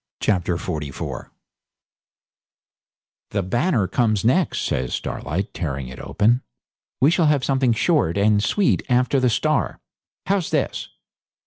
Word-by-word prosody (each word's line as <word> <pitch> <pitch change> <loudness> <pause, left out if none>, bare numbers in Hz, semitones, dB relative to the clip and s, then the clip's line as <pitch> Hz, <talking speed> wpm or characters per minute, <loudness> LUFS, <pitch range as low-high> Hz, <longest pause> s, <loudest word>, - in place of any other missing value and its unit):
Chapter 90 -4 0
44 75 -6 -5 2.0
'The 100 -2 -1
"Banner" 120 - +1
comes 110 -3 +1
next,' 165 +10 +2
says 65 0 -1
Starlight, 95 +6 -4
tearing 70 -6 -4
it 65 - -10
open. 120 +4 +1 0.6
'We 140 +4 +5
shall 170 -2 +3
have 145 -3 +2
something 130 -3 +2
short 115 - +1
and 105 +1 +3
sweet 200 - +2
after 125 +2 +2
the 130 -1 +3
"Star". 135 +6 0 0.5
How's 195 -3 0
this? - - -1
115 Hz, 120 wpm, -22 LUFS, 90-140 Hz, 2.0 s, We